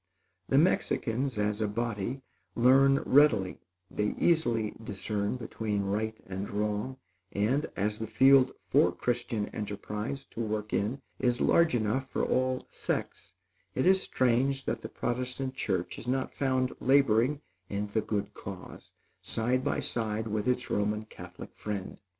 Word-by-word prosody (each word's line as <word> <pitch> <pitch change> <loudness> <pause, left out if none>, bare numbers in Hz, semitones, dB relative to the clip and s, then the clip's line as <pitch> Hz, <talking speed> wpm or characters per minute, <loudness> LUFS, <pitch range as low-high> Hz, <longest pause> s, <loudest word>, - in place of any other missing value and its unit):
The 135 - +4
Mexicans, 135 -6 +1
as 105 +1 0
a 110 - +2
body, 115 +3 -3 0.3
learn 135 +3 +5
readily; 125 -10 +4 0.3
they 105 0 -1
easily 120 -11 +2
discern 100 +1 -2
between 110 -4 -2
right 110 +3 -2
and 95 +2 -5
wrong; 105 +5 -2 0.4
and, 125 +9 +1
as 105 +2 -1
the 110 - -3
field 130 +4 +6 0.2
for - - +4
Christian 120 -3 -2
enterprise 105 +5 -4
to - - -8
work 105 -1 -3
in 120 +7 -1 0.2
is 125 -1 +1
large 170 -6 +4
enough 120 +4 0
for - - -1
all 130 0 0
sects, - - -4 0.4
it 130 - +1
is 190 +1 +5
strange 130 +2 +1
that - - -2
the - - -6
Protestant 125 +2 -3
church 95 -9 -2
is - - -10
not 130 +1 -1
found 130 -2 0
laboring 135 +1 +3 0.3
in 100 +1 -2
the 105 +2 -1
good 105 -1 -2
cause, - - -9 0.3
side 125 +3 0
by - - 0
side 110 -1 -2
with 105 +1 -1
its 125 -1 0
Roman 105 +1 0
Catholic - - -11
friend. 100 -3 -5
115 Hz, 145 wpm, -30 LUFS, 105-130 Hz, 0.4 s, field